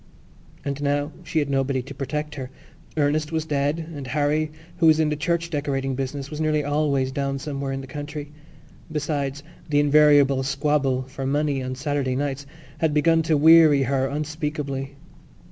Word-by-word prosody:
And 140 0 -3
now 145 +1 0
she 170 - -4
had 145 -2 +2
nobody 135 -1 0
to 135 - -9
protect 150 +2 -4
her. 130 -3 -6 0.5
Ernest 150 +1 +1
was 160 -1 -1
dead 145 +2 -1
and 140 -2 -6
Harry, 150 +3 0 0.3
who 170 -2 +4
was 160 0 +6
in 155 -1 +3
the 150 - 0
church 170 +2 -1
decorating 135 -3 -1
business, 135 +1 -4
was 155 0 -4
nearly 155 -1 +1
always 145 -2 +1
down 140 0 -2
somewhere 140 -1 -4
in 135 0 -3
the - - -8
country. 145 +2 -7 0.6
Besides, 145 -2 -2 0.3
the 145 -1 +3
invariable 145 -2 +5
squabble 140 -1 0
for 130 +1 -6
money 145 -1 0
on 130 0 -4
Saturday 140 -2 -1
nights 140 0 -3 0.3
had 160 -2 +1
begun 165 +2 +4
to 160 -1 +2
weary 155 -2 +7
her 135 0 +1
unspeakably. 145 -2 -4
145 Hz, 165 wpm, -24 LUFS, 135-150 Hz, 0.6 s, weary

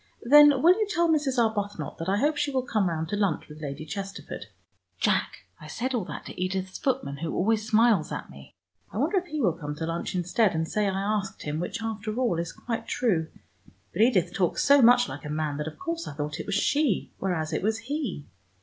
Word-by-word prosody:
"Then 290 +2 +7
will 345 +2 +8
you 430 - +1
tell 345 -3 +2
Mrs. 295 -5 +1
Arbuthnot 205 -8 -1
that 165 +3 -3
I 195 - +2
hope 295 +7 +2
she 295 - 0
will 260 -2 0
come 215 -6 +1
round 160 -1 -2
to 205 - -1
lunch 200 -6 0
with 150 0 -12
Lady 145 +1 -5
Chesterford. 195 +4 -6 0.5
Jack, - - 0
I - - -11
said 260 +2 -3
all 225 -7 -1
that - - -7
to - - -8
Edith's 190 0 -2
footman, 255 - -1
who 160 +2 -3
always 220 +3 +1
smiles 220 -6 +3
at - - -5
me. - - -14 0.4
I - - -6
wonder 405 - +1
if 365 - -12
he 310 -2 -4
will 195 - +2
come 150 -3 -6
to 160 - -4
lunch 165 +2 -3
instead, 180 +2 +1
and 160 0 -1
say 210 +3 0
I 195 0 -1
asked 200 -1 -2
him, 150 +1 -3
which 180 +6 -4
after 215 -1 -3
all 240 -9 +1
is 170 -1 -3
quite 230 -2 -5
true. 180 -10 +1 0.7
But 190 - 0
Edith 185 -7 +3
talks 180 -3 +1
so 280 0 +7
much 245 +1 +6
like - - -8
a 150 - -6
man, 150 -1 -2
that 150 +1 -3
of 155 - -7
course 335 -2 -4
I - - -6
thought 150 0 -4
it - - -6
was 200 - -1
she, 285 - +1
whereas 165 -4 -2
it - - 0
was 220 +2 +1
he. 245 - -4
205 Hz, 230 wpm, -27 LUFS, 165-250 Hz, 0.7 s, will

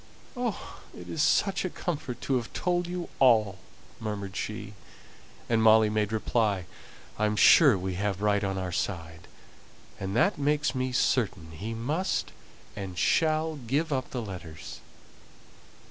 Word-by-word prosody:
"Oh, 245 -4 -4 0.2
it - - -10
is 160 - -2
such 195 +5 +2
a 185 - -1
comfort 145 -9 -4
to 135 - 0
have 120 -2 -5
told 175 -1 0
you 175 0 -4
all!" 110 -7 +4 0.4
murmured 100 -3 -5
Cynthia. 105 -1 -5 0.7
And 115 -1 +2
Molly 110 -1 +6
made 105 0 0
reply, 110 -4 0 0.5
"I 105 - +3
am 105 - -1
sure 135 - +7
we 95 0 -3
have 100 -2 -1
right 105 0 +1
on 95 -1 -1
our 95 -1 -3
side; 85 -2 -4 0.7
and 95 +1 -4
that 195 - +2
makes 150 0 +1
me 130 -1 -1
certain 100 -10 0
he 105 +8 -5
must 150 +12 -1 0.4
and 95 -3 -6
shall 155 - +2
give 140 +5 -1
up 130 -1 -2
the 125 -3 -4
letters." 85 -6 -8
110 Hz, 145 wpm, -28 LUFS, 100-145 Hz, 0.7 s, sure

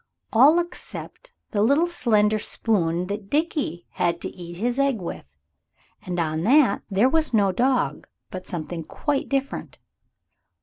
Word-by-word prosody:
All 275 +8 +7
except 360 +7 -6 0.2
the 205 - 0
little 280 +10 +4
slender 215 -10 +2
spoon 180 -6 0
that 200 +1 -6
Dickie 290 - -1
had 170 -1 0
to - - -3
eat 175 -1 -9
his 240 +7 -1
egg 275 -5 +2
with. 75 - -8 0.6
And 180 -1 -4
on 155 -1 -1
that 250 - +4
there 205 +5 +3
was 310 -3 +2
no 200 -3 +3
dog, 245 - 0 0.2
but 185 0 -7
something 170 -1 -4
quite 280 - -2
different. 275 0 -3
215 Hz, 140 wpm, -24 LUFS, 175-275 Hz, 0.6 s, All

